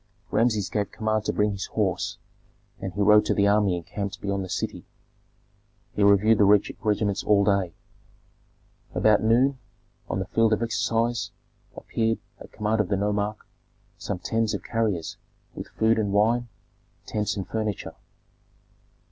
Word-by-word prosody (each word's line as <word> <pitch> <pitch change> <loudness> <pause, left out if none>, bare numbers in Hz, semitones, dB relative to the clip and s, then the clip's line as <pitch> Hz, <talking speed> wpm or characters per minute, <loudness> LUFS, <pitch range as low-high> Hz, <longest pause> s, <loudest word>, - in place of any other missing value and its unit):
Rameses 110 -3 +2
gave 105 -2 -2
command 110 -1 -1
to - - +1
bring 105 0 +1
his 100 0 -4
horse, 95 -5 -1 0.6
and 95 - -4
he 100 +3 -3
rode 105 +1 +6
to - - +1
the 100 - +3
army 100 -3 +3
encamped 100 +4 -5
beyond 100 -1 -2
the 95 - -8
city. - - -3 1.1
He - - -2
reviewed 100 +2 +5
the - - +6
regiments 105 0 +2
all 100 -1 +4
day. 100 -5 +1 1.2
About 110 -1 +4
noon, 125 +5 +3 0.5
on - - -1
the 95 - -2
field 115 +3 +2
of 110 - 0
exercise, 115 +1 0 0.5
appeared, 115 0 -1 0.2
at - - -12
command 105 0 0
of 100 - -3
the 100 - +1
nomarch, 105 +1 -1 0.6
some - - -3
tens 110 +4 -1
of - - -6
carriers 110 -8 -2 0.4
with - - -7
food 110 0 +1
and 105 -2 0
wine, 115 +4 +2 0.6
tents 105 -1 -2
and 95 - -4
furniture. 110 -3 -3
105 Hz, 150 wpm, -25 LUFS, 100-110 Hz, 1.2 s, rode